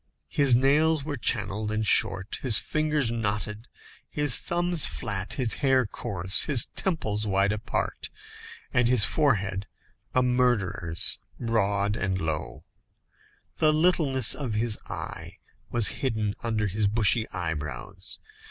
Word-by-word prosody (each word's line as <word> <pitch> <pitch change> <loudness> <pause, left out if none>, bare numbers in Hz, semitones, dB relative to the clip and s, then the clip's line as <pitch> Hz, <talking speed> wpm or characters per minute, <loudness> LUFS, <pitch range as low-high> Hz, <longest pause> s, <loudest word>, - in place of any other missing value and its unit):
His 140 -4 +3
nails 145 +4 +3
were 145 0 -4
channelled 105 -3 0
and 110 0 -1
short, 100 -1 +3
his 120 -5 +3
fingers 150 -5 0
knotted, 105 0 -3 0.4
his 145 -5 +3
thumbs 175 -2 0
flat, 95 -1 -4
his 125 -5 0
hair 135 -3 +3
coarse, 95 -4 +1
his 135 -6 +4
temples 110 - -2
wide 100 +1 +2
apart, 105 0 -3 0.6
and 120 -1 +3
his 120 -4 +6
forehead 100 -10 0 0.5
a 130 - +4
murderer's, 120 -10 0 0.2
broad 105 -3 0
and 95 -3 -2
low. 80 -3 -4 0.9
The 155 - +3
littleness 155 -6 +2
of 125 -7 -4
his 110 0 0
eye - - -6 0.4
was 120 -3 +2
hidden 110 -6 -1
under 110 -2 -1
his 105 +1 0
bushy 110 +1 +2
eyebrows. 75 -8 -5
110 Hz, 125 wpm, -26 LUFS, 100-135 Hz, 0.9 s, his